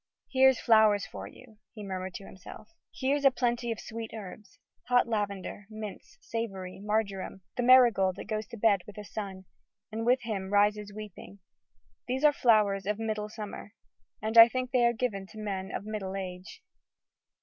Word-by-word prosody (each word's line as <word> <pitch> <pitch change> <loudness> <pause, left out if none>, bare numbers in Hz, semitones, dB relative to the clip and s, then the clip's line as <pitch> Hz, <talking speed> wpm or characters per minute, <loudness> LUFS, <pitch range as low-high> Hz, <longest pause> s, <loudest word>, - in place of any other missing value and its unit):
"Here's 265 -1 +5
flowers 215 -4 +4
for - - -8
you!" 225 -4 -16 0.2
he 210 - -8
murmured 185 -1 -5
to 195 - -8
himself, 190 +3 -12 0.2
"Here's 280 +2 -1
a 275 - +8
plenty 240 -2 -1
of 225 - -4
sweet 225 0 -7
herbs! 205 -1 -10 0.3
Hot 245 -1 +4
lavender, 205 -2 -3
mints, 215 -2 -9
savory, 195 -5 -5
marjoram, 200 -2 -2
The - - -1
marigold 235 -7 +5
that - - -8
goes 215 0 -3
to 235 - -9
bed 205 -3 +3
with 210 - -11
the 210 - -7
sun, 195 -3 -6 0.5
And 225 +1 -3
with 245 +1 +3
him 200 -4 -3
rises 205 0 +2
weeping: 205 -1 -10 0.7
these 260 +3 -2
are 300 -1 +6
flowers 210 -6 +3
Of 210 0 0
middle 215 -1 -3
summer. 215 0 -8 0.5
And 220 +1 +4
I 230 - +12
think 255 +1 -3
they 245 -2 +4
are 235 - +2
given 215 -5 -3
To 215 - -14
men 195 -3 -4
of - - -5
middle 205 -3 -4
age." 185 - -7
215 Hz, 170 wpm, -29 LUFS, 195-235 Hz, 0.7 s, I